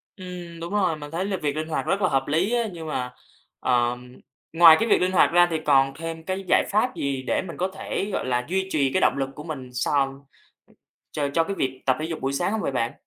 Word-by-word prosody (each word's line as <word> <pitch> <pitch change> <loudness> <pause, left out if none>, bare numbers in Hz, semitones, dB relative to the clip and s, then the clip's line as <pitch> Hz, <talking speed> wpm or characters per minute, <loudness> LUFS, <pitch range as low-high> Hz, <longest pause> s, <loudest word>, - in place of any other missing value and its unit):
Ừm, 180 -3 -9
đúng 170 +4 -6
rồi, 185 -6 +2
mình 145 0 -9
thấy 175 +3 -2
là 195 -2 -2
việc 145 -3 -2
linh 155 +1 -3
hoạt 160 - -2
rất 200 - 0
là 185 - +3
hợp 135 0 0
lý 170 +10 +1
á, 240 -1 +2
nhưng 165 -2 -7
mà, 125 -4 -3 0.5
ờ, 120 -1 +1 0.6
ngoài 165 -1 +8
cái 225 - 0
việc - - +4
linh 185 +1 +2
hoạt 185 - +4
ra 175 +1 +5
thì 160 - +1
còn 135 -2 +4
thêm 165 0 -6
cái 190 +2 -3
giải - - +4
pháp 215 +5 +1
gì 135 -2 -2
để - - +1
mình 165 - -8
có 185 - 0
thể, 200 +1 -3
gọi - - -2
là, 125 -1 0
duy 190 +1 0
trì 140 -6 +1
cái 185 - +2
động - - +4
lực 135 -1 -1
của 150 - -8
mình 145 -6 -7 0.2
sòn 135 -1 0 1.1
cho 165 +2 +2
cái 200 - -3
việc 130 0 -2
tập 130 -1 +3
thể - - -2
dục 165 -1 -5
buổi 135 +1 -1
sáng 175 +8 0
hông 220 - -1
vậy - - -1
bạn? 120 -2 -1
160 Hz, 255 wpm, -24 LUFS, 135-185 Hz, 1.1 s, ngoài